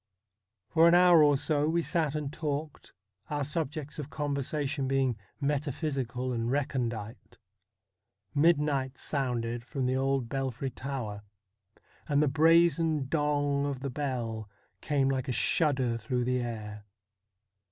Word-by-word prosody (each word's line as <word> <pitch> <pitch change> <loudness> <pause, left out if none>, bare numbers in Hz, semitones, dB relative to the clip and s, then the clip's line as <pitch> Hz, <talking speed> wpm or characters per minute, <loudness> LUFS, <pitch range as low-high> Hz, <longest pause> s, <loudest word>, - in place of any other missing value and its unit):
For 165 0 +5
an 170 - +6
hour 175 -2 +7
or 145 -2 +5
so 150 +1 +1
we 170 +1 +1
sat 160 -5 0
and 150 -1 -3
talked, 150 -1 -4 0.4
our 145 -1 -1
subjects 150 0 -3
of 145 -1 -5
conversation 145 -1 -2
being 135 -2 +1 0.2
metaphysical 140 -3 -2
and 115 0 -1
recondite. 120 -5 -3 1.0
Midnight 145 -4 +2
sounded 120 -4 -2
from 135 +1 -3
the 130 +1 +1
old 135 -2 0
belfry 135 0 -3
tower, 125 -6 -5 0.9
and 145 -1 +3
the - - +2
brazen 160 -1 +3
dong 145 -2 +1
of 135 -2 -4
the 140 -1 -3
bell 120 -6 -3 0.3
came 140 -3 +1
like 135 0 -1
a - - -1
shudder 130 -3 +2
through 125 +2 -2
the 125 +1 0
air. 105 -3 -5
140 Hz, 130 wpm, -29 LUFS, 125-150 Hz, 1.0 s, hour